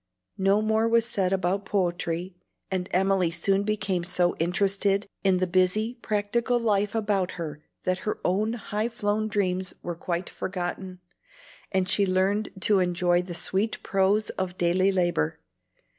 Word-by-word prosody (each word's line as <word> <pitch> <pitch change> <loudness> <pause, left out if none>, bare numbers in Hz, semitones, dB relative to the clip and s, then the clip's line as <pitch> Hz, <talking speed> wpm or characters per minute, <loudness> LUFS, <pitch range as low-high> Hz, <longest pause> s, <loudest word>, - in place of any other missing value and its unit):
No 195 +2 +3
more 220 +1 +2
was 230 0 +3
said 195 -6 0
about 190 +1 0
poetry; 175 -2 -1 0.4
and 185 -1 -2
Emily 190 -1 +2
soon 195 +4 +1
became 200 -4 -1
so 175 0 +1
interested 195 +3 +1 0.2
in 190 -2 +4
the 185 - +1
busy, 185 +6 +1
practical 225 +3 0
life 210 -2 +1
about 205 -4 0
her 150 -3 -6 0.2
that 185 0 0
her 215 - -3
own 210 +5 +1
high 215 0 -2
flown 215 -1 -1
dreams 185 -3 -1
were 175 - -3
quite 170 +1 -3
forgotten, 185 0 -5 0.7
and 190 -1 +1
she 195 +1 +2
learned 195 +3 +1
to 205 -2 +4
enjoy 175 -1 +2
the 180 -1 -7
sweet 190 +6 -1
prose 195 +2 +2
of 185 -1 -4
daily 185 +3 +3
labor. 175 - 0
190 Hz, 145 wpm, -26 LUFS, 180-205 Hz, 0.7 s, in